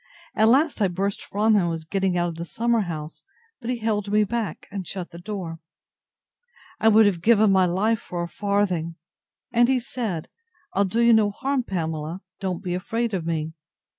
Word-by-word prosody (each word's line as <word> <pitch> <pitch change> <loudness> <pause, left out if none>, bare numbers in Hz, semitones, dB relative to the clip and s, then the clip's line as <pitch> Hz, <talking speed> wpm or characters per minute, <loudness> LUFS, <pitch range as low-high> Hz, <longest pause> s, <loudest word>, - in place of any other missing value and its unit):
—At 220 - +4
last 275 +2 +3
I 200 - +4
burst 195 +3 -2
from 215 +2 +1
him, 205 - +4
and 175 - 0
was 165 -1 -4
getting 190 +1 0
out 175 0 +1
of 165 - -7
the 170 - -4
summer 230 +6 0
house; 160 -4 -6 0.4
but 235 - -6
he 250 - 0
held 210 -3 -1
me 210 0 +4
back, 215 -5 -3
and 195 -4 -5
shut 185 -3 -5
the 170 - -10
door. 175 -4 -5 1.2
I - - +3
would 220 0 +7
have 185 -5 +1
given 215 0 +5
my 190 -1 +4
life 210 +6 +1
for 175 -1 -5
a - - -3
farthing. 185 -4 -1 0.6
And 240 0 +5
he 265 -1 +3
said, 225 -9 -4 0.5
I'll 200 +1 +3
do 225 +5 0
you 235 0 +6
no 215 -2 +4
harm, 270 +6 -1
Pamela; 165 -4 -3 0.2
don't 185 -2 -3
be 180 -2 -2
afraid 225 +5 -2
of 170 -4 -2
me. 160 -1 -2
200 Hz, 195 wpm, -24 LUFS, 175-225 Hz, 1.2 s, would